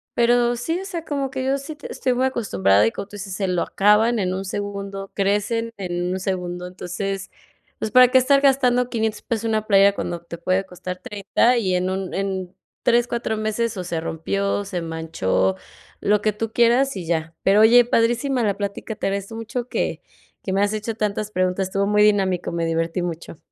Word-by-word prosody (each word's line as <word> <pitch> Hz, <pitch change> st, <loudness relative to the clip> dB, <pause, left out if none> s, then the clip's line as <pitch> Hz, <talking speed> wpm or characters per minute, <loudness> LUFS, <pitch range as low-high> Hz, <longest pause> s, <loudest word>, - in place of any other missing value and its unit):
pero 240 Hz, 0 st, +3 dB
sí, 325 Hz, +8 st, -2 dB
o 385 Hz, -, -7 dB
sea, 340 Hz, -4 st, -5 dB
como 280 Hz, -3 st, -2 dB
que 260 Hz, -1 st, -3 dB
yo 270 Hz, +1 st, +1 dB
sí 280 Hz, +3 st, -8 dB
te 290 Hz, -, -9 dB
estoy 255 Hz, -, 0 dB
muy 255 Hz, +1 st, +1 dB
acostumbrada 105 Hz, -, +2 dB
y 115 Hz, -, +2 dB
como -, -, -6 dB
tú 205 Hz, -, -12 dB
dices: 195 Hz, -2 st, -6 dB
“Se 195 Hz, -1 st, -1 dB
lo 180 Hz, -1 st, 0 dB
acaban 215 Hz, +4 st, +3 dB
en 185 Hz, -2 st, 0 dB
un 190 Hz, +1 st, -3 dB
segundo, 200 Hz, 0 st, -5 dB
crecen 210 Hz, +3 st, 0 dB
en 180 Hz, -2 st, -2 dB
un 190 Hz, -, -2 dB
segundo”. 180 Hz, -1 st, -3 dB
Entonces, 195 Hz, +2 st, -5 dB, 0.5 s
pues, 220 Hz, -, -3 dB
¿para 250 Hz, +1 st, +7 dB
qué 260 Hz, -, +5 dB
estar 275 Hz, +2 st, +4 dB
gastando 250 Hz, -3 st, +3 dB
$500 220 Hz, -2 st, -2 dB
pesos 230 Hz, -1 st, -3 dB
en 225 Hz, -, 0 dB
una 215 Hz, -1 st, 0 dB
playera 200 Hz, -1 st, +5 dB
cuando 175 Hz, -3 st, -3 dB
te 170 Hz, 0 st, -9 dB
puede 185 Hz, +3 st, 0 dB
costar 180 Hz, 0 st, -7 dB
30? 210 Hz, +5 st, +1 dB
Y 190 Hz, -6 st, +1 dB
en 180 Hz, +1 st, 0 dB
un 190 Hz, 0 st, -3 dB
en 190 Hz, -2 st, -3 dB, 0.3 s
3 240 Hz, 0 st, +3 dB
4 235 Hz, -2 st, -2 dB
meses, 220 Hz, +1 st, -1 dB
o 180 Hz, -, -4 dB
se 165 Hz, -2 st, -3 dB
rompió, 195 Hz, +5 st, -2 dB
se 185 Hz, -3 st, -4 dB
manchó, 160 Hz, -, -1 dB, 0.5 s
lo 205 Hz, 0 st, +2 dB
que 215 Hz, 0 st, +1 dB
tú 225 Hz, +1 st, -4 dB
quieras 240 Hz, +1 st, +3 dB
y 175 Hz, -, -5 dB
ya. 160 Hz, -1 st, -2 dB
Pero, 200 Hz, +2 st, +5 dB
oye, 240 Hz, +2 st, +7 dB
padrísima 240 Hz, +2 st, +1 dB
la 205 Hz, -3 st, 0 dB
plática, 205 Hz, +2 st, -4 dB
te -, -, -2 dB
agradezco 200 Hz, +3 st, -3 dB
mucho 235 Hz, +2 st, -5 dB
que -, -, -2 dB, 0.4 s
que 190 Hz, -, -3 dB
me 195 Hz, -, +2 dB
has 205 Hz, +1 st, +1 dB
hecho 215 Hz, +1 st, -3 dB
tantas 210 Hz, -1 st, -2 dB
preguntas. 185 Hz, 0 st, 0 dB
Estuvo 195 Hz, +1 st, 0 dB
muy 210 Hz, 0 st, +4 dB
dinámico, 195 Hz, -4 st, +2 dB
me 170 Hz, -1 st, -1 dB
divertí 165 Hz, +2 st, -1 dB
mucho. 170 Hz, -2 st, -6 dB
205 Hz, 205 wpm, -22 LUFS, 185-235 Hz, 0.5 s, para